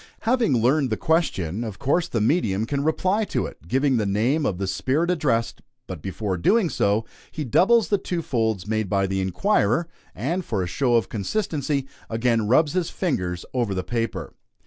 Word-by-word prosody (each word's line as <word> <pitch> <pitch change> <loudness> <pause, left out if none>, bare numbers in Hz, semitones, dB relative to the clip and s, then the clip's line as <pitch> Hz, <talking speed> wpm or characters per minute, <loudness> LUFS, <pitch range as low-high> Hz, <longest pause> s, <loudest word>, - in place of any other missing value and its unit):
Having 225 - +2
learned 130 +4 +2
the 110 - -1
question, 115 - 0
of 110 -4 -6
course 170 +6 +1
the 120 - -1
medium 110 - +1
can 140 +3 -2
reply 185 +7 +1
to - - -1
it, 80 - -10
giving 135 +5 +2
the 110 - 0
name 120 +10 +1
of 95 - -2
the 100 - -2
spirit 145 - 0
addressed; 130 -9 0 0.2
but 90 -5 -7
before 95 +1 -3
doing 195 - +2
so, 105 +2 +1 0.3
he 155 - -4
doubles 195 - +3
the 205 - +2
two 175 -3 -3
folds 110 -8 -1
made 110 -2 -1
by 100 0 +2
the 95 0 -1
inquirer, 120 - +1 0.3
and, 170 - -2
for 100 - -2
a - - -2
show 120 +6 +1
of 115 - +2
consistency, 140 - -2 0.2
again 115 -1 +1
rubs 145 +6 +3
his 180 -2 0
fingers 90 - -2
over 120 -6 0
the 95 - -2
paper. 115 -7 -3
120 Hz, 185 wpm, -24 LUFS, 100-160 Hz, 0.3 s, doubles